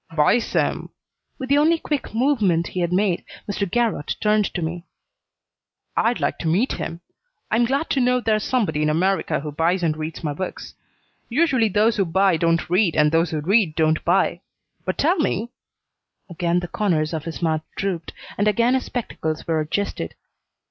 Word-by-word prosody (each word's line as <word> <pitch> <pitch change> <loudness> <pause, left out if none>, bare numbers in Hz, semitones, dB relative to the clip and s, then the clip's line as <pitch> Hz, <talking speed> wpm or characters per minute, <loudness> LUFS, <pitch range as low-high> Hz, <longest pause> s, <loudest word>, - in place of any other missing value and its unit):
"Buys 165 +10 +3
them!" - - 0 0.5
With 260 -2 -6
the 285 +1 +4
only 325 +3 +4
quick 295 -4 -3
movement 215 - +2
he 185 - -4
had 175 -1 0
made, 185 -1 +1 0.2
Mr. 200 -1 -2
Garrott 230 -8 0
turned 210 -1 +2
to 175 - -1
me. 170 +2 -5 1.1
"I'd 235 +1 +1
like - - -1
to 165 - -3
meet 195 +11 +2
him. 165 +1 -5 0.5
I'm 235 +2 +3
glad 275 +6 0
to 275 - +2
know 250 0 +3
there's 215 -3 +1
somebody 200 - 0
in 150 - +2
America 185 +1 +1
who 150 0 -5
buys 170 +5 0
and 155 -2 +1
reads 155 +1 -6
my 150 -2 -1
books. 185 +5 -6 0.6
Usually 255 -4 +2
those 215 +3 +2
who 195 - +2
buy 190 +2 +3
don't 165 +1 +1
read, 180 0 +2
and 150 -1 +4
those 165 +1 +2
who 155 -2 -2
read 185 -1 +2
don't 155 -1 +2
buy. 175 +3 +2 0.4
But - - -2
tell 340 +6 +2
me 235 - -1 0.4
" - - -53
Again 175 +1 0
the 175 - -5
corners 165 -6 0
of 160 -1 -4
his 165 +1 -6
mouth 160 -1 +1 0.2
drooped, 180 -5 -3 0.3
and 205 - +2
again 235 +4 +3
his 260 - 0
spectacles 160 -10 -4
were 160 -1 0
adjusted. 155 - -3
185 Hz, 185 wpm, -22 LUFS, 165-230 Hz, 1.1 s, the